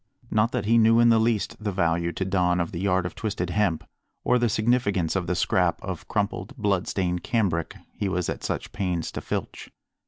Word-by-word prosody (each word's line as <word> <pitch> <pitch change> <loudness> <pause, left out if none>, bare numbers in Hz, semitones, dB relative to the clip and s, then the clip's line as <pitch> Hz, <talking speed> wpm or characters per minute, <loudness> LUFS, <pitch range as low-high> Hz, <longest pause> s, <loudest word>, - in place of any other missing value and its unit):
Not 110 +2 +2
that 100 - -2
he 115 +2 +4
knew 115 +1 +5
in 120 0 +6
the 115 -1 +5
least 110 -2 0
the 105 - -1
value 85 -2 0
to 95 - -2
Don 90 -2 +1
of 85 - -1
the 85 - -5
yard 95 -1 +1
of 90 - -4
twisted 100 -5 -3
hemp, 95 -5 +1 0.4
or 125 - +3
the 120 -1 +2
significance 105 -6 +1
of 95 -3 -1
the 90 - 0
scrap 85 - +1
of - - -6
crumpled, 105 +7 -2
bloodstained 95 -4 0
cambric 90 -7 -1 0.2
he 100 - -2
was 90 -1 -1
at - - -4
such - - -3
pains 90 -4 -2
to - - -5
filch. - - -5
95 Hz, 205 wpm, -25 LUFS, 90-110 Hz, 0.4 s, in